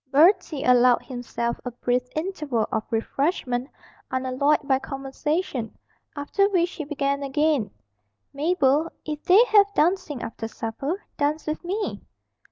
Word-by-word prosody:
Bertie 305 -1 +4
allowed 250 -1 +5
himself 240 -2 -4
a 250 - -3
brief 245 +1 0
interval 305 - -1
for 220 - 0
refreshment 250 +2 -1 0.4
unalloyed 260 +3 +1
by 265 -2 +3
conversation, 270 -1 -3 0.4
after 395 +8 +1
which 355 -3 +1
he 320 - -5
began 280 -1 -1
again: 280 -4 +1 0.6
'Mabel, 300 0 +2 0.2
if 300 -1 -4
they 400 +7 +7
have 405 -1 +5
dancing 330 -5 +1
after 225 0 -5
supper, 275 - -4
dance 300 +2 0
with 310 +2 -3
me.' 400 +4 -3
285 Hz, 125 wpm, -24 LUFS, 255-330 Hz, 0.6 s, they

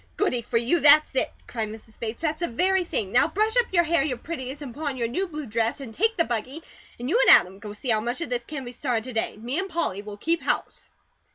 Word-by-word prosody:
"Goody 255 -12 +1
for 230 +1 -1
you! 240 +9 +2
That's 305 0 +6
it!" 260 - 0
cried 220 -3 -4
Mrs. 220 0 -12
Bates. 230 +3 -5
"That's 310 -1 0
the 345 - 0
very 370 +9 +2
thing! 210 - -3
Now 245 - +4
brush 430 +7 0
up 485 -1 +2
your 345 -2 +4
hair 330 -3 +2
your 265 -4 -2
prettiest, 285 0 -6
and 255 -4 -7
put 305 +4 -5
on 270 -2 -2
your 235 -2 0
new 370 +12 -2
blue 305 -3 -6
dress, 230 +1 -1
and 250 -5 -8
take 450 - +1
the 335 - +4
buggy, 255 +5 -4 0.4
and 245 - -4
you 455 - +3
and - - +11
Adam 185 +2 -5
go 210 0 -8
see 215 +5 -6
how 220 -2 +3
much 240 +6 -3
of 335 - -3
this 245 -1 -1
can 275 0 -6
be 245 - -6
started 245 -3 -2
to 255 +1 -7
day. 225 -1 -2
Me 245 +9 -2
and 385 +1 -3
Polly 325 - -1
will 205 0 -9
keep 330 +9 0
house." - - -2
260 Hz, 270 wpm, -25 LUFS, 230-330 Hz, 0.4 s, and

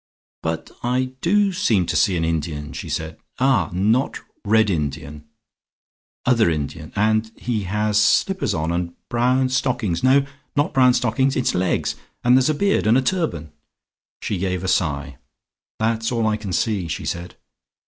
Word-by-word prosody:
"But 80 0 -3
I 130 +1 0
do 200 +3 +3
seem 110 - +2
to - - -2
see 95 -4 +3
an 80 - 0
Indian," 75 -2 -3
she - - -6
said. 80 0 -4 0.2
"Ah, 130 - +2
not 110 +9 +1 0.2
red 110 0 +3
Indian, 75 -2 -4 1.0
other 115 -7 +4
Indian. 75 0 -4
And 110 +1 +2
and 110 - -23
he 110 -5 -2
has 105 +2 +1
slippers 190 - +2
on 80 +1 -1
and 85 0 -2
brown 125 +2 +2
stockings 125 -9 -1
no, 135 +2 +4 0.3
not 145 +1 +1
brown 125 -2 +5
stockings; 130 +3 +1
it's 130 - +1
legs. 90 0 0 0.3
And 125 +1 +5
there's 130 +2 +4
a 155 - +1
beard, 200 - +1
and 115 +3 +5
a - - +3
turban." 130 - -1 0.7
She 100 - -2
gave 90 -1 -2
a - - -2
sigh. 70 -6 -1 0.6
"That's 115 +1 0
all 115 -2 0
I 110 -1 +2
can 105 -3 -6
see," 95 0 0
she 80 - -4
said. 85 +1 -4
110 Hz, 165 wpm, -22 LUFS, 85-125 Hz, 1.0 s, brown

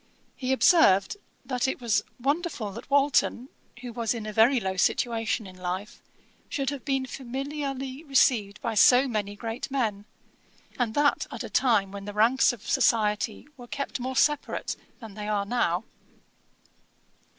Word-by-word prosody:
He 260 -1 -3
observed, 260 - +4 0.3
that 255 -1 -1
'it 265 - -2
was 235 -4 +1 0.2
wonderful 280 - -1
that 230 +7 -10
Walton, 275 -2 +2 0.3
who 245 -2 -7
was 230 0 -1
in 225 -2 -5
a 215 - -5
very 235 +5 +5
low 190 -3 -3
situation 225 +3 0
in 185 -1 -11
life, 185 +3 -5 0.5
should 275 -1 -1
have 280 -3 -6
been 270 -2 -1
familiarly 270 +1 -5
received 235 -7 +2
by 230 -3 -2
so 250 +5 +6
many 205 -4 -3
great 225 +3 -5
men, 220 -7 -1 0.7
and 230 -3 0
that 290 0 +2
at - - -6
a - - -8
time 210 -7 +2
when 200 0 -8
the 205 - -6
ranks 230 +7 +4
of 230 -3 -11
society 215 +2 +1
were 245 -1 -11
kept 280 +1 -4
more 260 +1 -4
separate 295 +2 0 0.2
than 225 -5 -10
they 210 0 -6
are 205 -1 0
now.' 200 -5 0
240 Hz, 155 wpm, -27 LUFS, 210-270 Hz, 0.7 s, so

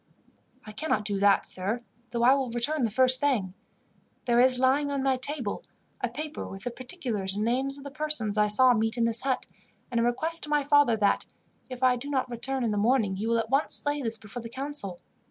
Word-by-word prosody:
"I 215 - -9
cannot 215 -2 -2
do 200 -2 -1
that, 200 0 +3
sir, 205 +6 0 0.3
though 235 0 -2
I 255 +2 +6
will 270 -2 -1
return 245 +6 +1
the - - -1
first 255 +3 +3
thing. 240 -11 0 0.7
There 240 -1 +2
is, 255 0 +5
lying 265 +3 +2
on 280 -1 -2
my 270 -1 +2
table, 255 -4 -2 0.4
a - - 0
paper 305 0 -6
with 195 0 -9
the 245 - -3
particulars 240 - -4
and 210 +1 -1
names 265 +4 +1
of 280 - -11
the 280 - -8
persons 300 -8 +3
I 210 0 +3
saw 250 +4 +5
meet 225 +1 -1
in 235 - +1
this 230 0 +1
hut, 265 -1 -1 0.5
and 235 - 0
a - - +2
request 315 +8 0
to - - -11
my 295 -1 +1
father 285 -5 +3
that, 205 -2 +1 0.4
if 255 0 -7
I 250 -1 +4
do 275 +4 -7
not 260 -3 -1
return 260 +2 -1
in 230 - 0
the 210 - -2
morning, 215 -3 +1
he 215 +3 -3
will 230 0 +1
at 225 +1 -3
once 275 +2 0
lay 290 0 -1
this 225 -3 +2
before 220 +3 -9
the 230 - -8
council. 265 -8 -3
245 Hz, 225 wpm, -27 LUFS, 220-275 Hz, 0.7 s, I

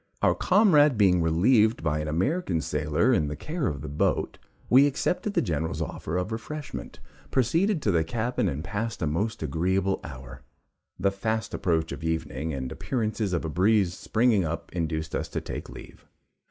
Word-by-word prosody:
Our - - +5
comrade 155 - +4
being 95 -4 +4
relieved 105 +8 +3
by 75 -1 0
an 75 - -3
American 90 - 0
sailor 75 - +1
in 75 -10 +2
the 75 - -4
care 155 - -3
of 70 -4 -3
the 75 - -6
boat, 70 +1 -1 0.3
we 135 +4 +6
accepted 180 +8 -1
the - - +3
General's 80 -1 -2
offer 80 +4 -3
of 90 +4 -2
refreshment, 145 +7 -6 0.3
proceeded 160 - +1
to 105 - +2
the 80 -3 +2
cabin, 115 +8 -1
and 70 +3 -4
passed 100 +2 -3
a - - +2
most 85 +7 -1
agreeable 95 +6 0
hour. 65 -2 -9 0.6
The 100 - +2
fast 110 +3 -2
approach 80 -2 0
of - - -6
evening 80 -2 -2
and 65 -3 -4
appearances 110 -5 -2
of 85 -2 -1
a - - -2
breeze 95 +3 +2
springing 115 -3 +2
up 80 0 -4
induced 80 -2 -2
us - - -2
to - - -2
take - - -7
leave. - - -12
95 Hz, 175 wpm, -26 LUFS, 80-115 Hz, 0.6 s, we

